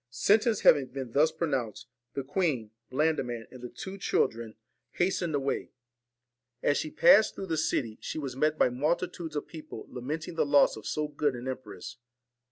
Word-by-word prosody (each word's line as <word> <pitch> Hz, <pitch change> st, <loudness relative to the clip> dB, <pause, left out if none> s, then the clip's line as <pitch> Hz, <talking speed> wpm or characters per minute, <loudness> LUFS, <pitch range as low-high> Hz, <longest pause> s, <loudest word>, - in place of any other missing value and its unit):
Sentence 210 Hz, -, +3 dB
having 140 Hz, -4 st, +6 dB
been 130 Hz, -2 st, -6 dB
thus 150 Hz, +5 st, +4 dB
pronounced, 135 Hz, -9 st, -2 dB, 0.3 s
the 140 Hz, -, -2 dB
queen, 135 Hz, -, -1 dB, 0.2 s
Blandiman, 130 Hz, -5 st, 0 dB
and 130 Hz, -, -11 dB
the 125 Hz, -, -6 dB
two 195 Hz, +8 st, -8 dB
children, 115 Hz, -9 st, 0 dB
VALEN -, -, -45 dB, 0.4 s
hastened 175 Hz, -3 st, 0 dB
away. 140 Hz, -1 st, -2 dB, 0.9 s
As 145 Hz, -, +3 dB
she 155 Hz, -, -2 dB
passed 220 Hz, -, +6 dB
through 195 Hz, -, -5 dB
the 165 Hz, -3 st, -1 dB
city, 130 Hz, -5 st, 0 dB
TINE 110 Hz, -, -12 dB
AND -, -, -27 dB
she -, -, -4 dB
was 135 Hz, -5 st, -4 dB
met 155 Hz, +3 st, +1 dB
by -, -, +4 dB
multitudes 160 Hz, +5 st, -2 dB
of 145 Hz, -, -2 dB
people 155 Hz, -8 st, -9 dB
lamenting 150 Hz, +7 st, -4 dB
the 165 Hz, -, 0 dB
ORSON 145 Hz, -, -5 dB
joss 145 Hz, -5 st, +5 dB
O -, -, -6 dB
f -, -, -15 dB
so 150 Hz, 0 st, -1 dB
g 145 Hz, -, -21 dB
00 145 Hz, -1 st, +3 dB
d -, -, -6 dB
an 120 Hz, +2 st, -7 dB
empress. 130 Hz, -2 st, -7 dB
145 Hz, 200 wpm, -29 LUFS, 125-160 Hz, 0.9 s, having